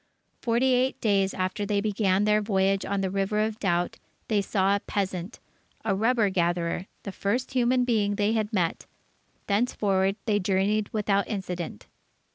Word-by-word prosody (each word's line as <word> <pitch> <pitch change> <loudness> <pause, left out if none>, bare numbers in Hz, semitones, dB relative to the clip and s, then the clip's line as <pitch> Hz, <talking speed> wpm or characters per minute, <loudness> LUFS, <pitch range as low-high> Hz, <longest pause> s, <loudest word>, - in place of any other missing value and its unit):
Forty 245 +2 +2
eight 255 +1 +1
days, 195 -3 +2
after 185 +3 -2
they 205 0 0
began 200 -2 +1
their 210 0 +3
voyage 195 -1 +1
on 200 0 -1
the 190 -1 -1
River 195 +2 -1
of 215 +1 0
Doubt, 175 -3 0 0.3
they 210 -2 +2
saw 195 0 +1
a - - 0
peasant, 190 0 -3 0.5
a 210 - +2
rubber 220 0 +2
gatherer, 175 0 0 0.2
the 200 - -5
first 220 +8 -2
human 250 -1 +2
being 210 -4 +1
they 205 +2 +1
had 215 -1 -1
met. 180 -6 -1 0.6
Thenceforward 200 -3 +1
they 210 -2 +2
journeyed 200 +2 +1
without 200 -2 +1
incident. 180 - -5
200 Hz, 155 wpm, -26 LUFS, 190-215 Hz, 0.6 s, their